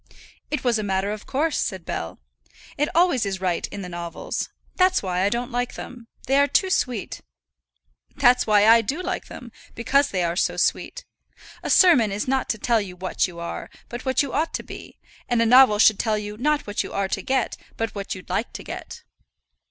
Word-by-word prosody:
"It 300 - -2
was 240 -3 +2
a - - -2
matter 195 0 -1
of 210 0 -7
course," 300 +4 0
said 190 -4 -3
Bell. 80 +2 -5 0.6
"It 295 +1 0
always 340 -8 +3
is 195 -2 -3
right 180 -2 -1
in 200 -1 -7
the - - -6
novels. 170 -1 -5 0.3
That's 370 - +3
why 180 -1 -1
I 195 - +3
don't 240 +3 -3
like 245 +1 -2
them. 240 -2 -9 0.2
They 270 +2 +3
are 285 - +4
too 380 +5 +1
sweet." 250 - -1 0.9
"That's 250 -4 +4
why 210 -1 +5
I 230 +1 +7
do 270 - -3
like 365 +1 -3
them, 240 -2 -10 0.2
because 275 +5 +2
they 185 -2 -1
are 170 0 -1
so - - 0
sweet. - - -1 0.6
A - - -5
sermon 265 - +5
is 205 +4 -3
not 265 0 0
to 220 - 0
tell 230 0 +1
you 185 -3 -7
what 185 +1 -1
you 170 -2 -10
are, 170 - -6 0.2
but 240 +1 -6
what 260 +1 +1
you 280 - -6
ought 320 +2 0
to - - -4
be, - - -11 0.3
and 240 -1 +2
a 230 - +4
novel 250 -2 +7
should 215 -1 +5
tell 220 -2 +1
you 210 0 -5
not 295 +6 0
what 205 0 -2
you - - -6
are 200 -1 0
to - - -2
get, 265 -2 0 0.2
but 225 -1 -2
what 200 -1 -5
you'd 185 - -11
like 225 - -2
to - - -7
get." - - -8
230 Hz, 215 wpm, -23 LUFS, 200-265 Hz, 0.9 s, I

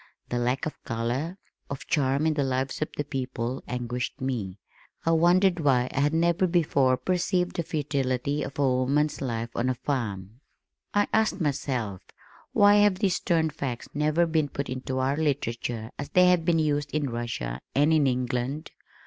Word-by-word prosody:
The 120 - -1
lack 125 +2 0
of 155 - -6
color, 125 +9 -2 0.3
of 140 - -6
charm 140 0 +1
in 160 - +3
the 145 -2 0
lives 130 +1 -2
of 155 - 0
the 145 - 0
people 130 -3 -4
anguished 125 0 -3
me. 115 -8 -3 0.5
I 165 - +3
wondered 175 +2 +4
why 130 -4 +2
I 140 - -1
had 145 +1 +3
never 170 +2 +3
before 140 -7 +2
perceived 180 +5 0
the - - 0
futility 140 -2 -1
of 135 - -5
woman's 140 +2 +1
life 115 -3 -3
on 125 +2 0
a 130 - 0
farm. 115 -5 -3 0.5
I 205 0 +2
asked 220 -2 +2
myself, 125 - -2 0.5
"Why 205 0 +6
have 205 -2 +5
these 190 -2 +1
stern 160 -2 +1
facts 135 -5 -5
never 155 +3 +2
been 160 -3 +1
put 140 -2 -4
into 130 0 -3
our 135 +2 +1
literature 120 -6 -2
as 140 - -4
they 180 0 +5
have 175 -3 +3
been 170 -1 +3
used 145 -2 +1
in 145 -4 0
Russia 110 - -4
and 145 +3 +4
in 150 -3 +4
England? 125 +4 -2
140 Hz, 170 wpm, -27 LUFS, 125-160 Hz, 0.5 s, Why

